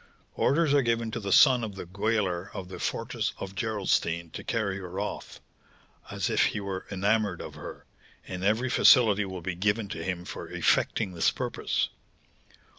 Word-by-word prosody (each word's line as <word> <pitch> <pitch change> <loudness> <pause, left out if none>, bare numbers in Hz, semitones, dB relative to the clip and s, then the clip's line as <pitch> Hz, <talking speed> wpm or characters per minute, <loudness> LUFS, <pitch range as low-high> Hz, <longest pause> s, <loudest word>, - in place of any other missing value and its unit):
Orders 150 0 +2
are 145 - +5
given 115 -2 0
to 115 - -3
the 100 -3 -4
son 125 +2 +6
of 105 -3 -5
the 95 - -7
gaoler 95 -1 -1
of 90 -1 -6
the 95 - -8
fortress - - -2
of 95 0 -6
Gerolstein 95 -6 -1
to - - -7
carry 100 -4 -1
her 90 0 -6
off, 105 - -5 0.7
as - - -2
if - - +3
he - - -1
were 95 -2 -5
enamoured 100 -1 +1
of - - -7
her, - - -9 0.4
and 90 0 -5
every 110 +5 +1
facility 105 -6 +6
will 95 -2 -6
be 95 - -2
given 105 +3 0
to 80 - -5
him 90 -1 -3
for - - -7
effecting 95 - +1
this 85 - +3
purpose. - - -2
100 Hz, 175 wpm, -28 LUFS, 95-110 Hz, 0.7 s, son